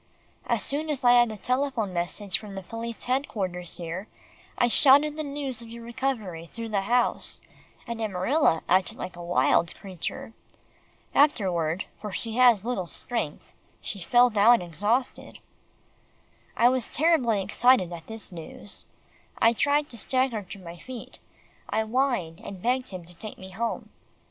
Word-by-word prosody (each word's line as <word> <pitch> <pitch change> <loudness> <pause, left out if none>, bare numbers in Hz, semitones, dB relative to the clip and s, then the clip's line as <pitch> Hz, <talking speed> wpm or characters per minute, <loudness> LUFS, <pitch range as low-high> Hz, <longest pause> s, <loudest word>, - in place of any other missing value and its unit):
As - - +1
soon 300 +3 -2
as 275 -4 -2
I 245 - +8
had 240 -1 +6
the 215 - -6
telephone 250 -4 -1
message 180 +3 -1
from 200 -3 -7
police 230 +3 -6
headquarters 195 -9 -2
here, 175 +4 -5 0.5
I 240 - +4
shouted 285 +4 +6
the 310 - -3
news 280 -5 -4
of 230 - -10
your 235 0 -9
recovery 225 -9 -3
through 230 +5 -7
the 205 -2 +1
house, 240 +5 +2 0.5
and 235 -2 -5
Amarilla 200 - +2
acted 185 0 +2
like 185 - -6
a 175 - -9
wild 170 -1 +2
creature. 190 +3 -5 0.8
Afterward, 185 - +2
for 210 -1 -6
she 225 +3 -4
has 240 -6 +6
little 235 -8 -2
strength, 225 -6 -4 0.3
she 200 - -6
fell 245 +7 +5
down 225 +3 +6
exhausted." 205 - -1 1.2
I 235 - +6
was 255 -1 +1
terribly 275 -9 +2
excited 205 -2 +3
at 165 -1 -9
this 225 -2 -6
news. 175 +3 -7 0.5
I 230 - +5
tried 290 +4 +2
to 235 - -5
stagger 255 -2 0
to 195 0 -10
my 175 -2 -10
feet. 255 -3 -9 0.5
I 220 +1 +1
whined, 220 -8 0
and 195 -2 -7
begged 250 +5 0
him 185 -3 -7
to 175 - -14
take 210 +5 -9
me 190 0 -10
home. 230 +5 -3
225 Hz, 155 wpm, -27 LUFS, 185-250 Hz, 1.2 s, I